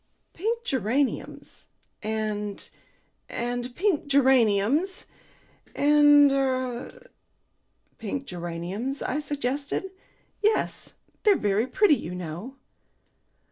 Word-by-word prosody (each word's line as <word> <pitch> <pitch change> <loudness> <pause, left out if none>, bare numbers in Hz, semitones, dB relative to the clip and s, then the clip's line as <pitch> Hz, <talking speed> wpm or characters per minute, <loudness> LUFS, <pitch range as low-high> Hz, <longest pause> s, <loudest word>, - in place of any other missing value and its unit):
"Pink 460 +6 -2
geraniums 260 - -2 0.3
and 210 -2 -3 0.6
and 245 +1 -3
pink 345 -5 0
geraniums, 265 - +3 0.7
and 290 -1 +6
er 260 - -2 0.5
" - - -44
"Pink 255 +5 -4
geraniums?" 180 +9 -4
I 290 - -1
suggested. 285 +5 -3 0.5
"Yes. 430 +1 0 0.3
They're 415 -2 +5
very 210 +3 +1
pretty, 305 - +4
you 175 +3 -6
know." 180 +9 -6
260 Hz, 85 wpm, -26 LUFS, 215-290 Hz, 0.7 s, and